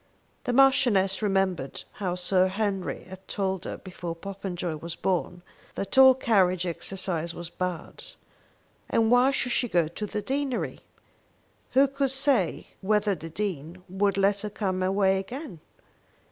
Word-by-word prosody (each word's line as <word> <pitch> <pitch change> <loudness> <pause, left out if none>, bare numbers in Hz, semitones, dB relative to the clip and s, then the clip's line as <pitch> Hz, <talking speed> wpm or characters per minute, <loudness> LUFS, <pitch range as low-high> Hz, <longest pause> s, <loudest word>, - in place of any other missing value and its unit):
The - - 0
Marchioness 245 -8 +4
remembered 190 -8 0 0.2
how 180 -2 -1
Sir 185 +1 +3
Henry 195 -1 -2
had 190 +1 -12
told 190 -2 -2
her, - - -5
before 175 -2 -7
Popenjoy 180 -3 -5
was 170 +2 -6
born, 180 -1 -2 0.3
that 200 - -4
all 265 -1 +8
carriage 185 -8 +2
exercise 170 -1 -3
was 175 -1 -7
bad. 180 -2 -5 0.9
And 225 0 +2
why 245 +2 +6
should 255 -2 -1
she 245 - +1
go 170 -4 +2
to 210 +6 -5
the 210 0 -4
deanery? 275 -2 -2 0.9
Who 270 +2 +6
could 275 0 -1
say 265 - +1
whether 210 +1 +2
the 165 -2 -7
Dean 175 -2 -4
would 195 +1 0
let 200 +1 +2
her 210 - -3
come 190 -3 -2
away 190 0 +2
again? 205 - -7
195 Hz, 145 wpm, -27 LUFS, 180-220 Hz, 0.9 s, all